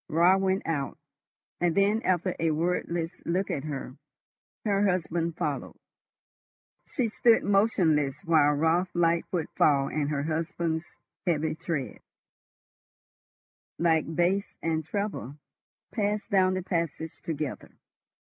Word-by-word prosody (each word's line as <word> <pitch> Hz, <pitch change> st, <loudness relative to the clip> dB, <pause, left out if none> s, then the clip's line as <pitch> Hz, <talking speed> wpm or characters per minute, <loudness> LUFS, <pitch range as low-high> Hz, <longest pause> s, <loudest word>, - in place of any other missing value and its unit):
Raut 175 Hz, +4 st, +4 dB
went 190 Hz, 0 st, 0 dB
out, 145 Hz, -5 st, -2 dB, 0.6 s
and 175 Hz, -2 st, +1 dB
then, 205 Hz, +3 st, +3 dB
after 185 Hz, -2 st, 0 dB
a 165 Hz, -, +2 dB
wordless 170 Hz, +1 st, -1 dB
look 185 Hz, +3 st, -1 dB
at 140 Hz, -, -3 dB
her, 135 Hz, -3 st, -5 dB, 0.7 s
her 200 Hz, -1 st, +2 dB
husband 170 Hz, -2 st, -1 dB
followed. 150 Hz, -5 st, -3 dB, 1.1 s
She 250 Hz, -4 st, -1 dB
stood 230 Hz, +1 st, +4 dB
motionless 165 Hz, -9 st, +2 dB
while 155 Hz, -3 st, +4 dB
Raut's 165 Hz, +5 st, +1 dB
light 170 Hz, -1 st, +2 dB
footfall 145 Hz, -5 st, +2 dB
and 150 Hz, -1 st, -1 dB
her 145 Hz, -2 st, -1 dB
husband's 165 Hz, +1 st, -2 dB, 0.4 s
heavy 160 Hz, -2 st, +1 dB
tread, 155 Hz, -4 st, -4 dB, 1.8 s
like 160 Hz, -1 st, +1 dB
bass 185 Hz, +4 st, +1 dB
and 160 Hz, -1 st, 0 dB
treble, 195 Hz, -, -4 dB, 0.6 s
passed 210 Hz, 0 st, -1 dB
down 185 Hz, -1 st, +4 dB
the 185 Hz, -, -2 dB
passage 165 Hz, -2 st, -3 dB
together. 150 Hz, -4 st, -4 dB
170 Hz, 115 wpm, -28 LUFS, 155-185 Hz, 1.8 s, Raut